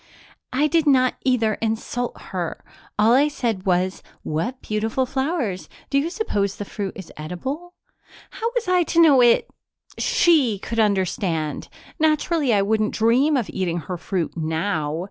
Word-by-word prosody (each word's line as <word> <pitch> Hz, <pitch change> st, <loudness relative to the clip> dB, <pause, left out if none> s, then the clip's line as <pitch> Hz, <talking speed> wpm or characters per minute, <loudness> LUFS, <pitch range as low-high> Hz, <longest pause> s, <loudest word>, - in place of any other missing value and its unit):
"I 275 Hz, +4 st, +2 dB
did 320 Hz, 0 st, +2 dB
not 255 Hz, -2 st, +4 dB
either 230 Hz, -5 st, +1 dB
insult 230 Hz, +2 st, -2 dB
her. 180 Hz, -3 st, -5 dB, 0.3 s
All 215 Hz, +3 st, +5 dB
I 280 Hz, +4 st, +5 dB
said 225 Hz, -9 st, -3 dB
was, 185 Hz, +1 st, +1 dB, 0.2 s
'What 225 Hz, +12 st, -2 dB
beautiful 220 Hz, +4 st, -1 dB
flowers 265 Hz, -, -2 dB, 0.2 s
do 275 Hz, -, +3 dB
you 305 Hz, +4 st, -1 dB
suppose 205 Hz, -, -1 dB
the 205 Hz, -, -6 dB
fruit 200 Hz, -1 st, -5 dB
is 190 Hz, -4 st, -9 dB
edible?' 265 Hz, -, -6 dB, 0.6 s
How 460 Hz, 0 st, -2 dB
was 470 Hz, -5 st, -1 dB
I 365 Hz, 0 st, +3 dB
to 335 Hz, 0 st, +1 dB
know 295 Hz, -6 st, +7 dB
it 240 Hz, -1 st, +4 dB, 0.5 s
she 290 Hz, -, +3 dB
could 230 Hz, +4 st, -4 dB
understand? 185 Hz, -6 st, 0 dB, 0.3 s
Naturally 310 Hz, -2 st, +2 dB
I 200 Hz, -2 st, +3 dB
wouldn't 215 Hz, +1 st, 0 dB
dream 255 Hz, +7 st, +3 dB
of 235 Hz, -5 st, -1 dB
eating 175 Hz, -3 st, -2 dB
her 180 Hz, +3 st, -5 dB
fruit 180 Hz, -3 st, -3 dB
now. 160 Hz, -1 st, -1 dB
225 Hz, 150 wpm, -22 LUFS, 190-280 Hz, 0.6 s, know